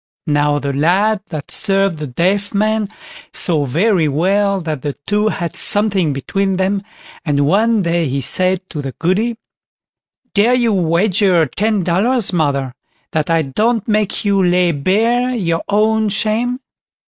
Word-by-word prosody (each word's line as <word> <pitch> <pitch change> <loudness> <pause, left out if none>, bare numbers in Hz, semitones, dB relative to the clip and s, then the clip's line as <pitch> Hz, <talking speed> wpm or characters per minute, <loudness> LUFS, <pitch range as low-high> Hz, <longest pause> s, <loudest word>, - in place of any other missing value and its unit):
Now 145 -2 +1
the 140 -1 -3
lad 190 +9 +1
that 155 -4 -6
served 195 -4 +1
the 150 - -4
deaf 190 - -1
man 215 0 0 0.4
saw 155 -5 0
very 170 - +1
well 195 +7 +1
that 155 -5 -4
the 145 +1 -3
two 210 +1 +1
had 175 -5 -3
something 205 -6 +3
between 195 +8 -2
them, 195 +1 0 0.4
and 145 -3 +1
one 215 +6 +2
day 170 -1 0
he 135 +1 -2
said 185 +7 +1
to 150 - -4
the 135 -2 -6
Goody: 215 +7 -1 1.0
"Dare 220 +5 +3
you 235 -3 +1
wager 180 0 +2
ten 205 - -1
dollars, 200 +6 +1
mother, 140 -6 -1 0.4
that 155 0 -1
I 165 -1 +2
don't 215 - -1
make 210 -1 -1
you 200 -1 +2
lay 180 0 +2
bare 230 - 0
your 170 -7 -1
own 215 +1 +2
shame?" 225 +5 -1
190 Hz, 145 wpm, -16 LUFS, 160-215 Hz, 1.0 s, something